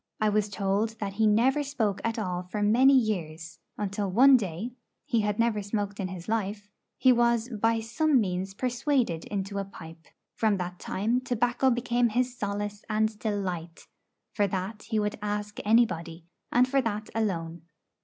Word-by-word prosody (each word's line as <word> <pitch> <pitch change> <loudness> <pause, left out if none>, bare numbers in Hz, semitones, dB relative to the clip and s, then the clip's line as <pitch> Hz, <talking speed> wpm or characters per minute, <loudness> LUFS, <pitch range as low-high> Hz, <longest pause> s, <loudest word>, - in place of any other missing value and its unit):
I 215 - +3
was 210 0 +1
told 205 +3 -1
that 200 -2 -3
he 220 +2 +2
never 245 +7 +3
spoke 245 -9 -1
at 230 0 -1
all 180 -5 -2
for 195 +4 -4
many 255 +6 +5
years, 165 -9 -2 0.2
until 200 0 -2
one 260 +8 +7
day 200 +1 -2 0.3
he 230 - +1
had 210 0 -1
never 230 -2 +1
smoked 205 0 -3
in 190 - -1
his 180 -2 -8
life 205 -2 -2 0.3
he 260 - +5
was 235 0 +2
by 225 0 +1
some 275 +5 +2
means 190 -1 -2
persuaded 245 - 0
into 200 0 -3
a - - -1
pipe. 165 -4 -12 0.3
From 215 -3 +1
that 180 -1 -5
time 230 +6 -1
tobacco 245 +1 +1
became 240 -1 +1
his 245 +2 0
solace 205 -1 -4
and 215 0 0
delight; 185 -6 -3 0.5
for 205 -2 +2
that 195 +3 -4
he 220 - 0
would 210 0 -1
ask 210 0 -3
anybody, 180 -7 +1 0.3
and 250 +1 +4
for 270 +1 +2
that 215 -3 -3
alone. 170 -7 -2
210 Hz, 165 wpm, -28 LUFS, 195-235 Hz, 0.5 s, one